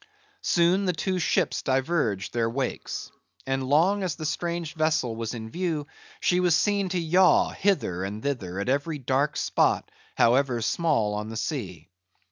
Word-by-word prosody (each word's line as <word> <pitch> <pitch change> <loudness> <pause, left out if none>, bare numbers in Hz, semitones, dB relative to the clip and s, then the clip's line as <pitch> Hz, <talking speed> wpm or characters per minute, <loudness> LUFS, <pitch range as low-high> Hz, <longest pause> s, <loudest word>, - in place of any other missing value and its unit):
Soon 180 - +2
the 180 - +1
two 185 +3 -1
ships 175 0 +1
diverged 130 - 0
their 115 -1 +1
wakes; 130 +2 -4 0.3
and 135 0 -1
long 165 +10 +3
as 185 -4 -2
the 155 - -6
strange 170 0 -2
vessel 155 -7 0
was 115 +1 -4
in 110 -1 -7
view, 165 -3 -2 0.3
she 180 - +2
was 180 -3 +3
seen 200 +1 +1
to 180 0 -1
yaw 180 +3 +4
hither 175 - 0
and 105 +3 -5
thither 100 -10 -3
at 100 - -3
every 145 +4 0
dark 135 +2 0
spot, - - +1 0.2
however 125 0 +3
small, 115 -4 +1
on 105 +1 -4
the 110 - -5
sea. 105 - -4
145 Hz, 160 wpm, -26 LUFS, 115-175 Hz, 0.3 s, yaw